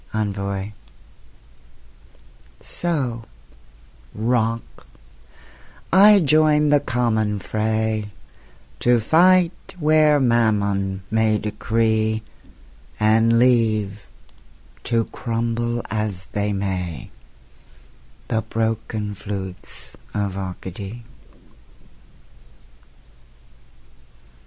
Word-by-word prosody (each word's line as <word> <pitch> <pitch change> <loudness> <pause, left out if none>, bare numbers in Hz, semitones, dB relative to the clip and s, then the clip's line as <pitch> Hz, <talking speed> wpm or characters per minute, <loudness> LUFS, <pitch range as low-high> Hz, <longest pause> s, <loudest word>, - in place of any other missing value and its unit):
ENVOY 100 -1 -3 1.9
So, 130 -10 -3 0.9
Rock, 115 0 -1 1.1
I 205 +2 +8
join 150 -1 +4
the 145 0 +5
common 115 -6 0
fray, 110 +1 -1 0.7
To 120 -1 +3
fight 175 +8 +3
where 155 -2 +4
Mammon 100 -6 +1
may 110 -1 +2
decree; 110 +1 0 0.8
And 110 +2 +4
leave, 110 -5 +2 0.8
to 115 -2 +1
crumble 115 0 -2
as 105 -4 -2
they 105 0 -1
may, 95 -6 -4 1.2
The 110 - 0
broken 110 -2 -2
flutes 95 -2 -7 0.2
of 100 -2 -1
Arcady. 95 +4 -7
110 Hz, 65 wpm, -22 LUFS, 105-120 Hz, 1.9 s, I